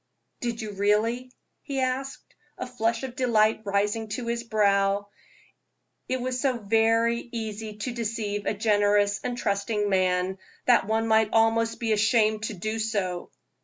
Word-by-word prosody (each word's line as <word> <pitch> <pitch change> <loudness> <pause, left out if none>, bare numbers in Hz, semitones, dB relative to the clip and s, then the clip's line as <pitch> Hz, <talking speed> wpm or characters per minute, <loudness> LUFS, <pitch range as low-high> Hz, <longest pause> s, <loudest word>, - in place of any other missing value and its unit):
"Did 235 -2 -3
you 215 - -5
really?" 215 +5 +1 0.3
he 275 -2 -4
asked, 265 +1 -3 0.2
a - - -4
flush 235 -1 -1
of 255 -2 -5
delight 220 -4 +2
rising 205 +2 0
to 235 +3 -4
his 235 0 -2
brow. 200 -2 +2 1.0
It 260 - +1
is 250 0 -2
so 265 -3 +1
very 225 +2 +2
easy 220 -2 -5
to 230 +4 -3
deceive 215 -3 -3
a 215 - 0
generous 205 -1 +2
and 245 -1 -3
trusting 205 -1 -1
man, 185 0 +1 0.3
that 240 -5 +4
one 225 +1 +1
might 220 -1 +4
almost 225 0 +2
be 225 -2 +1
ashamed 215 0 +2
to 215 - -4
do 215 +5 -3
it. 185 -5 -2
220 Hz, 150 wpm, -26 LUFS, 205-235 Hz, 1.0 s, that